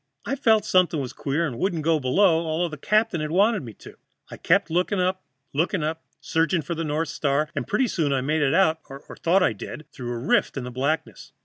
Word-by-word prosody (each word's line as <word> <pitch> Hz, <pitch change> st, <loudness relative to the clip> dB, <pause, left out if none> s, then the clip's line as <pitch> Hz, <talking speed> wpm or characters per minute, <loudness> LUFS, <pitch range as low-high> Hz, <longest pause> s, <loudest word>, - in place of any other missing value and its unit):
I 275 Hz, -, -1 dB
felt 220 Hz, -6 st, +3 dB
something 180 Hz, -5 st, +2 dB
was 130 Hz, -3 st, -5 dB
queer 150 Hz, +4 st, -1 dB
and 125 Hz, -6 st, -5 dB
wouldn't 175 Hz, -5 st, -1 dB
go 160 Hz, 0 st, +2 dB
below, 165 Hz, +5 st, +3 dB
although 165 Hz, +2 st, 0 dB
the 155 Hz, -, -7 dB
captain 175 Hz, -2 st, 0 dB
wanted 205 Hz, +4 st, +3 dB
me 115 Hz, -4 st, -9 dB
to. -, -, -14 dB, 0.3 s
I -, -, -8 dB
kept 180 Hz, 0 st, +2 dB
looking 180 Hz, +4 st, +1 dB
up, 185 Hz, +1 st, 0 dB, 0.3 s
looking 165 Hz, +3 st, 0 dB
up, 160 Hz, +1 st, -3 dB, 0.2 s
searching 165 Hz, +1 st, 0 dB
for 170 Hz, -, -4 dB
the 165 Hz, 0 st, -3 dB
north 155 Hz, +1 st, -2 dB
star, 150 Hz, 0 st, 0 dB
and -, -, -3 dB
pretty 250 Hz, +5 st, +1 dB
soon 160 Hz, -9 st, -1 dB
I 135 Hz, -1 st, +1 dB
made 150 Hz, +4 st, 0 dB
it 145 Hz, +2 st, +2 dB
out, 160 Hz, -4 st, +3 dB
or 135 Hz, 0 st, -8 dB, 0.2 s
thought 180 Hz, +3 st, +2 dB
I 120 Hz, -, +2 dB
did, 150 Hz, +8 st, -8 dB
through 125 Hz, -4 st, -6 dB
a 120 Hz, -, -3 dB
rift 120 Hz, +3 st, +1 dB
in 135 Hz, -, -3 dB
the 125 Hz, -, -6 dB
blackness. 140 Hz, +6 st, -3 dB
160 Hz, 225 wpm, -24 LUFS, 145-185 Hz, 0.3 s, felt